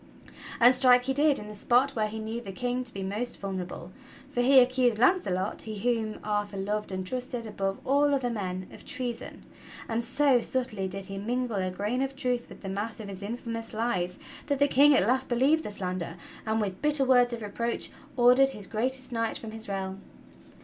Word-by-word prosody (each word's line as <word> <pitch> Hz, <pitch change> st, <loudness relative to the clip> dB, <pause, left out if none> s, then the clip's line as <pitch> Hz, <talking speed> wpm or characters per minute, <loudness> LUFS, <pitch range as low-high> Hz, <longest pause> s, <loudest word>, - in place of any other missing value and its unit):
And 245 Hz, +2 st, +7 dB
strike 250 Hz, -1 st, +5 dB
he 270 Hz, -, +1 dB
did 290 Hz, +1 st, +3 dB
in 210 Hz, -, -7 dB
the 210 Hz, -, -8 dB
spot 245 Hz, +6 st, +2 dB
where 220 Hz, -5 st, 0 dB
he 215 Hz, +1 st, -6 dB
knew 220 Hz, +2 st, -4 dB
the 200 Hz, -4 st, -7 dB
King 245 Hz, +5 st, -2 dB
to 245 Hz, -, +1 dB
be 195 Hz, -3 st, -5 dB
most 215 Hz, +6 st, -3 dB
vulnerable, 185 Hz, -2 st, -5 dB, 0.4 s
for 245 Hz, -, 0 dB
he 265 Hz, +2 st, +5 dB
accused 250 Hz, -2 st, +4 dB
Launcelot, 210 Hz, -, +1 dB
he 215 Hz, -1 st, -6 dB
whom 225 Hz, 0 st, -1 dB
Arthur 205 Hz, -1 st, -2 dB
loved 210 Hz, +1 st, -2 dB
and 185 Hz, 0 st, -3 dB
trusted 250 Hz, +2 st, -4 dB
above 195 Hz, -2 st, -2 dB
all 285 Hz, +2 st, +3 dB
other 265 Hz, -3 st, +1 dB
men, 185 Hz, -4 st, -3 dB
of -, -, -12 dB
treason; 250 Hz, -4 st, -5 dB, 0.4 s
and 230 Hz, +1 st, -1 dB
so 270 Hz, 0 st, +3 dB
subtly 230 Hz, -7 st, -1 dB
did 195 Hz, +1 st, -4 dB
he 195 Hz, 0 st, -5 dB
mingle 240 Hz, +1 st, -2 dB
a 185 Hz, -1 st, 0 dB
grain 210 Hz, +7 st, -2 dB
of 270 Hz, 0 st, -2 dB
truth 250 Hz, -3 st, -1 dB
with -, -, -12 dB
the 195 Hz, -, -7 dB
mass 210 Hz, +4 st, -4 dB
of 210 Hz, -2 st, -7 dB
his 195 Hz, 0 st, -7 dB
infamous 230 Hz, +1 st, -5 dB
lies 185 Hz, -6 st, -1 dB, 0.3 s
that 285 Hz, -1 st, +1 dB
the 285 Hz, +1 st, +4 dB
King 285 Hz, +2 st, +6 dB
at 185 Hz, -, +4 dB
last 260 Hz, +3 st, +1 dB
believed 275 Hz, +6 st, +3 dB
the -, -, -4 dB
slander, 180 Hz, -4 st, -4 dB, 0.3 s
and 220 Hz, 0 st, +1 dB
with 195 Hz, -3 st, -3 dB
bitter 295 Hz, -2 st, +2 dB
words 250 Hz, -1 st, +5 dB
of 235 Hz, -2 st, -5 dB
reproach 235 Hz, +3 st, -2 dB, 0.3 s
ordered 250 Hz, +2 st, +6 dB
his 210 Hz, -7 st, -7 dB
greatest 255 Hz, +6 st, -2 dB
knight 230 Hz, -1 st, -1 dB
from 225 Hz, -, -8 dB
his 220 Hz, -1 st, -7 dB
realm. 195 Hz, 0 st, -4 dB
230 Hz, 205 wpm, -28 LUFS, 200-255 Hz, 0.4 s, And